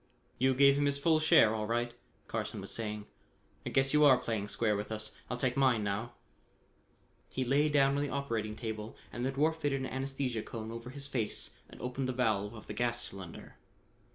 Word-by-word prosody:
"You 130 +1 +3
gave 140 +1 +6
him 145 - +3
his 140 0 +1
full 155 +2 +3
share 150 -8 +6
all 105 -1 -2
right," 120 +1 0 0.3
Carson - - -3
was - - -6
saying. 105 -2 -4 0.6
"I - - 0
guess 135 +1 +2
you 150 0 +6
are 135 -3 +8
playing 110 -4 -2
square 105 0 +1
with 105 +2 -4
us. 110 0 -4 0.2
I'll 125 - -2
take 125 0 0
mine 130 -5 +3
now." 105 +4 -2 1.2
He 130 - -2
lay 145 +4 +3
down 140 -1 +4
on - - +1
the 145 - -1
operating 115 -7 -2
table 110 -1 -5 0.2
and 120 - -3
the 130 - +1
dwarf 155 +4 +2
fitted 145 -4 0
an - - -2
anesthesia 130 -3 -2
cone 110 0 -6
over 115 +1 -7
his 140 +1 -6
face 125 -6 -2 0.2
and - - -13
opened 130 +1 -2
the - - 0
valve 110 -4 0
of 110 - -10
the - - -6
gas 120 +2 0
cylinder. 95 -7 -7
125 Hz, 205 wpm, -32 LUFS, 110-135 Hz, 1.2 s, are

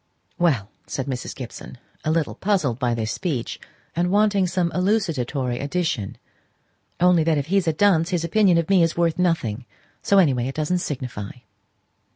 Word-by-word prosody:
"Well," 130 - +1 0.2
said 135 - -3
Mrs. 130 -3 -5
Gibson, 125 -1 -9 0.3
a - - -1
little 160 -1 0
puzzled 180 - 0
by 120 -3 +1
this 110 -2 -2
speech, 150 -11 -3 0.4
and 175 +1 +1
wanting 205 -1 +3
some 175 -1 0
elucidatory 150 - 0
addition. 140 - -2 0.8
"Only 180 -2 +4
that 160 -1 +2
if 140 - -1
he's 195 -3 +2
a 160 - +3
dunce 170 -1 +3
his 175 -3 -1
opinion 185 +1 +3
of 165 -1 0
me 195 -2 +4
is 165 0 +1
worth 170 0 +1
nothing. 130 -10 0 0.4
So, 200 - +3
any 165 -8 +5
way, 125 0 -1
it 135 - -5
doesn't 155 +4 0
signify." 125 -10 -5
165 Hz, 170 wpm, -23 LUFS, 130-180 Hz, 0.8 s, any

